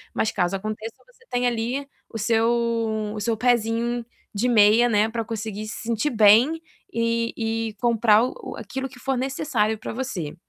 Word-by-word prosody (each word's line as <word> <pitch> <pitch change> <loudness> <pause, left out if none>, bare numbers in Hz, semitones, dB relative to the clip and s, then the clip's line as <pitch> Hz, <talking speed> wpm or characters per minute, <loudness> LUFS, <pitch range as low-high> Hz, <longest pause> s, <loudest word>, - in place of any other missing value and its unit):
mas 220 - +1
caso 180 -1 0
aconteça 215 +3 -5
você 485 -1 -25
tem 245 0 0
ali 245 +4 -2 0.2
o 225 - -5
seu 225 -1 0
o 210 - -4
seu 230 0 0
pezinho 235 0 +1 0.3
de 235 +5 0
meia, 225 +2 +5
né, 215 0 +2
para 230 0 -3
conseguir 215 -2 -5
se 215 - -6
sentir 230 +5 0
bem 225 +8 +5 0.3
e 230 0 0
e 225 -1 -2
comprar 225 -2 +4
o 255 - -5
aquilo 265 0 -5
que - - -15
for 270 0 -1
necessário 255 -5 0
para - - -6
você. 205 - -4
230 Hz, 165 wpm, -24 LUFS, 215-245 Hz, 0.3 s, meia